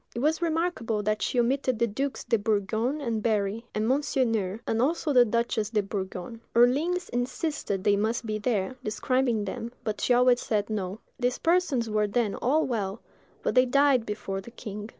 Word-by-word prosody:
It - - -2
was 310 +6 +1
remarkable 320 -11 0
that 215 +1 0
she 250 - 0
omitted 255 0 +1
the 235 - +3
dukes 270 +6 -3
de 230 - +1
Bourgogne 220 +6 0
and 230 -5 -1
Berry, 215 0 0
and 215 +1 0
Monseigneur, 230 -7 0
and 225 0 0
also 305 +2 +1
the 250 -2 +7
duchess 230 -2 0
de 215 -2 +1
Bourgogne. 195 +2 -5
Orleans 305 +10 +3
insisted 245 - -2
they 205 -1 +4
must 225 +4 -1
be 215 -1 -2
there, 215 +2 -1
describing 235 0 0
them; 225 +4 -5
but 210 -1 -3
she 245 - +3
always 245 0 +4
said 210 -1 -1
"No." 200 0 -3 0.2
These 250 0 0
persons 330 -9 +1
were 210 -1 +1
then 210 0 0
all 300 +6 +1
well, 210 -4 -2 0.4
but - - 0
they 255 0 +5
died 275 -2 +3
before 205 -2 -4
the 195 - -11
king. 210 -2 -7
230 Hz, 180 wpm, -27 LUFS, 210-255 Hz, 0.4 s, the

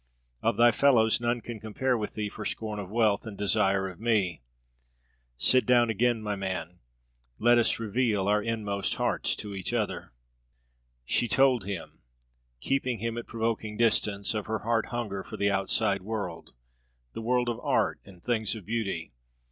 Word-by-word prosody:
Of - - +1
thy 120 0 +6
fellows 120 -3 +4
none 120 0 0
can 115 -2 -7
compare 115 +5 -1
with 105 -3 -4
thee 105 -1 -2
for 105 +1 -7
scorn 105 -1 -4
of 95 -3 -6
wealth 110 -1 +1
and 105 -3 -7
desire 100 -2 +2
of 95 -1 -9
me. 105 - +1 1.0
Sit 130 - +4
down 120 -2 +4
again, 115 +1 +1
my 105 -1 -2
man; 90 -3 -4 0.6
let 120 +1 +5
us 115 - +2
reveal 110 -3 0
our 105 +1 +3
inmost 105 -3 -2
hearts - - 0
to 105 -1 -6
each 95 +5 -3
other." 105 - -2 0.9
She 120 - +1
told 130 -1 +3
him, 100 -4 -6 0.6
keeping 130 - 0
him 115 +2 -3
at 120 - -6
provoking 110 -2 -2
distance, 105 -3 +2
of 105 -2 -3
her 110 0 -2
heart 115 -1 +1
hunger 105 -5 -4
for 110 - -8
the 100 -1 +2
outside 100 0 +1
world, 100 -4 -5 0.6
the - - -5
world 125 +1 +1
of 120 -1 -2
art - - +1
and 90 -3 -16
things 110 -3 0
of 105 -5 -9
beauty. 100 - -3
110 Hz, 165 wpm, -28 LUFS, 100-120 Hz, 1.0 s, thy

